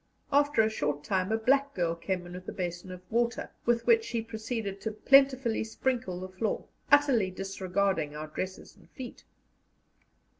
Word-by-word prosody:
After 285 -4 +4
a 220 - +2
short 145 -7 -2
time 185 +3 0
a 220 - +3
black 275 +5 +2
girl 170 -2 +1
came 175 +2 -3
in 175 - -9
with 185 +1 -7
a - - -4
basin 175 0 -4
of 180 -1 -8
water, 235 +1 0 0.2
with 235 -1 +2
which 455 -1 +5
she 230 - -2
proceeded 220 -3 -4
to 220 - -2
plentifully 265 +1 +4
sprinkle 225 -4 -2
the 185 - -5
floor, 185 +4 -2 0.3
utterly 270 -9 +5
disregarding 190 -4 -1
our 155 +1 -4
dresses 185 +5 -6
and - - -21
feet. 255 -3 -9
215 Hz, 165 wpm, -29 LUFS, 185-240 Hz, 0.3 s, which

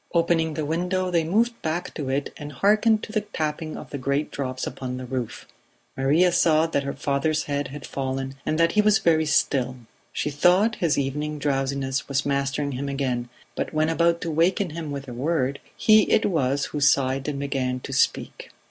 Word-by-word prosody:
Opening 165 -2 +2
the 155 - -2
window 180 +4 -1
they 170 -2 +2
moved 230 +8 +1
back 170 +3 -3
to 145 -4 -4
it 135 +1 -2
and 145 -1 -8
hearkened 215 +3 +3
to - - -6
the 215 -1 0
tapping 155 -5 -4
of - - -10
the 140 - -4
great 140 +3 -1
drops 130 -2 -3
upon 125 -1 -5
the 130 - -6
roof. 125 -2 -4 0.5
Maria 150 +7 +3
saw 160 -2 +4
that 160 -3 0
her 140 0 -4
father's 145 +2 0
head 145 -2 -2
had 140 0 -8
fallen, 135 0 -3
and 155 - -1
that 165 0 +3
he 210 - +4
was 210 0 +4
very 160 -6 +2
still; 130 -3 +1 0.4
she 150 - -2
thought 180 +9 +3
his 165 -4 +1
evening 150 +2 -2
drowsiness 135 -1 -1
was 140 0 -1
mastering 140 +1 -1
him 140 +2 -3
again, 130 -3 -2 0.3
but - - -3
when 155 +1 +2
about 170 +1 +2
to 165 - -2
waken 175 +3 +1
him 160 -1 -5
with 140 -1 -5
a 125 - -7
word, 140 +1 -1 0.2
he 215 -2 +5
it - - +3
was 140 -6 +1
who 150 - -1
sighed 135 -1 +2
and 145 -2 -2
began 135 -2 -2
to 135 - -7
speak. 135 - 0
150 Hz, 195 wpm, -24 LUFS, 135-165 Hz, 0.5 s, he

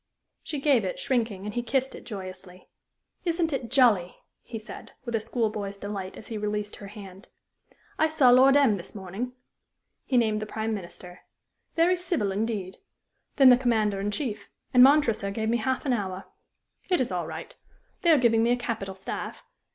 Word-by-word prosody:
She 295 - -5
gave 275 -5 +3
it, 185 - -3
shrinking, 225 -6 -1
and 210 - -4
he 240 - -1
kissed 260 +3 -1
it - - -11
joyously. 185 -3 -8 0.6
"Isn't 335 -2 0
it 245 -4 -3
jolly!" 230 -10 +4 0.3
he 230 - -7
said, 215 - -10
with 235 - -4
a 225 - +2
school 225 0 -1
boy's 200 -2 -5
delight 200 -2 -6
as - - -11
he 220 -2 -4
released 210 0 -3
her 200 - -9
hand. 195 0 -11 0.7
"I 315 - +4
saw 295 -6 +5
Lord 265 +3 +7
M 260 -8 +4
this 180 +3 -9
morning." 200 +6 -5 0.7
He 255 - 0
named 215 -2 +2
the 215 - -4
Prime 220 +1 -2
Minister. 180 -2 -8 0.6
"Very 345 +2 +4
civil, 340 - -1
indeed. 200 -2 -3 0.6
Then 270 -3 +8
the 245 - +7
Commander 220 -5 +1
in 200 +1 -1
Chief 220 0 -4 0.2
and 250 - +7
Montresor 250 -7 +5
gave 220 +2 -2
me 235 - +2
half 260 +5 -1
an 265 - +2
hour. 190 -4 -3 0.6
It 360 - +3
is 255 - 0
all 175 -3 -2
right. 160 +1 -7 0.5
They 345 - +2
are 310 - +7
giving 230 -3 +3
me 230 - +2
a 245 - +3
capital 220 -6 -4
staff. 190 - -6
220 Hz, 185 wpm, -27 LUFS, 200-255 Hz, 0.7 s, Then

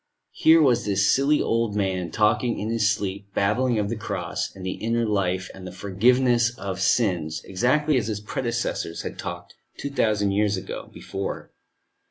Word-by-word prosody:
Here 160 +1 +5
was 120 -4 +3
this 100 -1 +2
silly 140 +3 +3
old 115 -2 0
man, 95 -3 -1
talking 110 +5 +1
in 110 +2 -3
his 115 -2 +2
sleep, 100 -2 -3
babbling 120 +4 +2
of 105 -1 0
the 115 - -2
Cross, 110 - -4
and 95 -1 -8
the 95 - -1
inner 115 +1 +1
life 95 -3 0
and 95 -1 -9
the - - -7
forgiveness 120 +6 +2
of 95 -1 -4
sins, 90 -7 +1
exactly 130 +9 +1
as 110 -4 -1
his 105 -2 -2
predecessors 115 -7 -3
had - - -6
talked - - -6 0.2
two 140 - -5
thousand 105 -6 +1
years 105 -1 +1 0.3
before. 95 0 -6
105 Hz, 165 wpm, -24 LUFS, 95-120 Hz, 0.3 s, Here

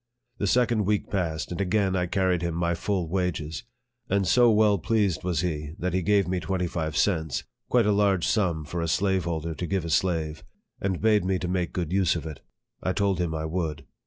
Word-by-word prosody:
The 100 - 0
second 120 -1 +2
week 105 +1 0
passed, 85 -6 -2
and 90 - -2
again 95 0 +1
I 90 -1 0
carried 95 -1 +1
him 85 -1 -2
my 85 0 0
full 90 0 -1
wages; 90 +1 -2 0.4
and 100 0 +2
so 120 +4 +5
well 105 -2 +4
pleased 100 -4 +1
was 85 -4 0
he, 75 -4 -3
that 90 0 -2
he 95 - +1
gave 100 +1 +2
me 90 0 0
twenty 90 0 -1
five 80 -3 -3
cents, 80 -7 +1 0.3
(quite 120 -3 +4
a 105 - +3
large 100 -3 +2
sum 85 -8 +1
for 85 +3 -4
a 85 - -1
slaveholder 85 -2 0
to 85 +2 -4
give 95 -2 -1
a 85 - -3
slave,) 80 -3 0 0.4
and 95 -2 -1
bade 110 -3 +4
me 95 0 +1
to 90 - -4
make 90 -1 -1
a - - -26
good 90 -1 -2
use 95 -3 +3
of 85 - -4
it. 75 -3 -7 0.4
I 95 - 0
told 100 -3 +1
him 85 -2 -1
I 80 0 -3
would. 80 -3 -3
90 Hz, 220 wpm, -26 LUFS, 80-100 Hz, 0.4 s, so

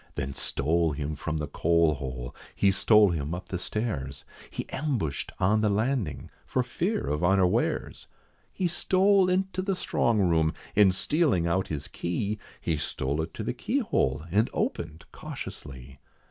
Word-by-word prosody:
Then 70 -1 -3
stole 80 +4 +1
him 75 +1 -3
from 75 +2 -3
the 75 - -2
coal 85 +2 +3
hole, 65 -3 -6 0.2
he 100 - +4
stole 105 0 +5
him 80 0 -2
up 90 - -8
the 90 - -3
stairs, 70 - -3 0.3
He - - -5
ambushed 130 - -2
on 105 +4 +3
the 105 - +3
landing, 110 - -1
for - - 0
fear - - -1
of 75 +4 -1
unawares. 95 0 +1 0.4
He 185 - -1
stole 190 +2 +3
into 185 0 0
the 195 0 -1
strong 115 -9 +1
room, 80 -5 +2 0.2
and 100 -2 +6
stealing 135 - +2
out 95 +3 +1
his 75 -2 -4
key, 100 +5 -2 0.2
He 80 - -1
stole 70 0 -2
it 80 - -4
to - - -4
the - - -2
keyhole, 65 +2 0
and 105 +5 +3
opened 80 -1 -3
cautiously. 65 0 -8
85 Hz, 155 wpm, -27 LUFS, 75-110 Hz, 0.4 s, and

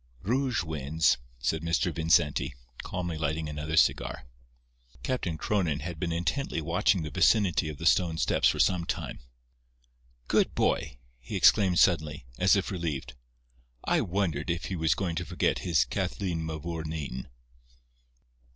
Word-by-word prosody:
"Rouge 125 0 0
wins," 80 -2 +1 0.2
said 65 +6 -1
Mr. 85 +1 0
Vincenti, 80 -5 +2 0.3
calmly 85 -3 -4
lighting 80 +1 -1
another 75 +1 -3
cigar. - - +2 0.8
Captain 95 -11 -2
Cronin 85 -6 0
had 85 -3 -6
been 85 -1 -2
intently 85 +7 -1
watching 85 +2 +1
the 75 - -5
vicinity 90 -1 +3
of 75 - -7
the 80 - -6
stone 85 -1 +3
steps - - +2
for - - +1
some 90 -2 +2
time. - - -4 1.1
"Good - - +2
boy!" - - 0 0.2
he - - -7
exclaimed 95 -5 +5
suddenly, 75 -8 +2
as 95 +2 +5
if 100 +1 -1
relieved. 80 -8 -3 0.7
"I - - +2
wondered 85 -5 -1
if 85 +1 -1
he 95 - -3
was 80 -2 +2
going 90 -4 -2
to 90 - -1
forget 90 +2 0
his 85 -3 +2
Kathleen 85 -5 -2
Mavourneen." 80 -4 -5
85 Hz, 140 wpm, -28 LUFS, 80-90 Hz, 1.1 s, exclaimed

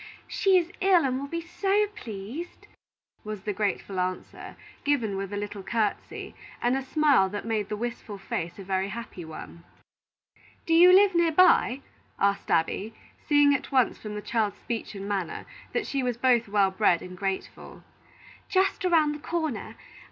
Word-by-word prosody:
She 385 -2 +3
is 350 -1 0
ill, 370 -5 +5
and 260 0 0
will 280 - -5
be 335 +3 -3
so 390 +4 +1
pleased," 225 - -7 0.6
was 215 -2 -6
the 210 - -2
grateful 200 -1 -2
answer, 185 0 -4 0.3
given 245 -9 +1
with 195 0 -4
a 205 - -3
little 205 0 -5
courtesy, 215 +1 -2 0.3
and 245 +2 +1
a 270 - -1
smile 275 -7 +3
that 205 +2 -5
made 215 -3 -1
the 210 - -3
wistful 230 -2 -5
face 170 -3 -4
a 195 - -8
very 190 0 -1
happy 215 -4 -7
one. 160 +1 -10 1.0
"Do 330 - +1
you 350 +2 +8
live 390 +1 +6
near 340 -1 +3
by?" 310 -6 +4 0.4
asked 200 0 0
Abby, 190 +6 0 0.3
seeing 290 -1 +5
at 280 - -3
once 260 -3 +2
from 210 -1 -7
the 210 - -5
child's 215 -4 -1
speech 230 -2 -5
and 195 0 -6
manner 195 -5 -3 0.3
that 475 -4 -1
she 275 - -1
was 245 -2 -1
both 240 -2 +3
well 200 -1 +2
bred 190 -3 +2
and 180 0 -9
grateful. 195 +1 -5 0.7
"Just 385 +1 +1
around 325 -5 +3
the 295 - -6
corner. 315 -4 -3
230 Hz, 170 wpm, -27 LUFS, 200-305 Hz, 1.0 s, you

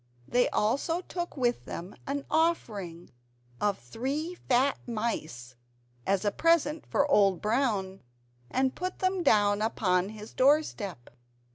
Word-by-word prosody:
They 245 0 +2
also 280 +11 0
took 350 -3 -5
with 245 -2 0
them 175 +3 -7
an 280 +1 -2
offering 205 - -1 0.5
of 205 -1 +1
three 270 - -4 0.2
fat 260 +2 +3
mice 155 - -3 0.5
as 195 +1 +1
a 205 - +3
present 325 0 +2
for 285 - +2
Old 200 - +4
Brown, 210 -5 0 0.5
and 260 0 +1
put 365 +1 -4
them 370 0 0
down 205 -8 +3
upon 190 -4 +1
his 215 0 -10
door 290 +4 +5
step. 190 - -7
235 Hz, 130 wpm, -29 LUFS, 200-285 Hz, 0.5 s, door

